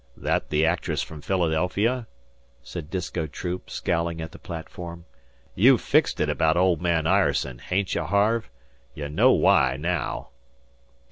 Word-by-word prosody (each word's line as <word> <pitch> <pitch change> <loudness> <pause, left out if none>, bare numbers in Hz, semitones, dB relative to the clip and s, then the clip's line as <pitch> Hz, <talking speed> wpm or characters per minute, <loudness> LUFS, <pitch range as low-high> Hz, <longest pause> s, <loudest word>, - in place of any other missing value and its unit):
"That - - -1
the 75 +1 +2
actress 85 +1 0
from 75 -2 -9
Philadelphia?" 95 - 0 0.6
said 75 +4 -7
Disko 85 -2 -3
Troop, 90 +2 -5
scowling 85 0 -1
at 80 +1 -6
the - - -13
platform. 85 0 -8 0.5
"You've - - +5
fixed - - +2
it - - +2
about 80 +1 +2
old 90 -3 +3
man 85 -3 +1
Ireson, 70 -9 +1
hain't 95 0 -1
ye, - - 0
Harve? 105 - +1 0.5
Ye 75 -1 -4
know 75 - +4
why 65 0 +4
naow." 85 +4 -2
85 Hz, 140 wpm, -25 LUFS, 80-90 Hz, 0.6 s, You've